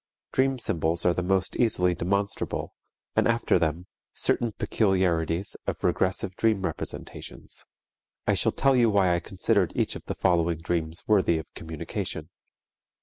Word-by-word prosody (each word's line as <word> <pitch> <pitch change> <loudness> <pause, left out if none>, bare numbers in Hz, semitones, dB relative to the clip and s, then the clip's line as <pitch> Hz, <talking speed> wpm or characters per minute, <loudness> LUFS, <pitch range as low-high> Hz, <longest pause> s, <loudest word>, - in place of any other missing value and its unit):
Dream 135 0 +2
symbols 85 -7 0
are 90 - +5
the 90 - -1
most 95 +1 0
easily 90 -7 +3
demonstrable, 100 +4 -1 0.4
and - - +3
after 115 -5 +2
them, 85 +1 -1 0.3
certain 120 -2 +1
peculiarities 95 -5 +1
of - - -3
regressive 95 0 0
dream 110 -4 +1
representations. 85 -5 -5 0.6
I - - +3
shall - - +3
tell 135 -1 +3
you 120 -2 +5
why 95 -4 +3
I 85 - +1
considered 95 +2 +1
each - - 0
of - - -8
the - - -4
following 85 -2 +2
dreams 80 0 -2
worthy 95 -6 +4
of 80 - -5
communication. 80 -2 -5
90 Hz, 145 wpm, -27 LUFS, 85-100 Hz, 0.6 s, are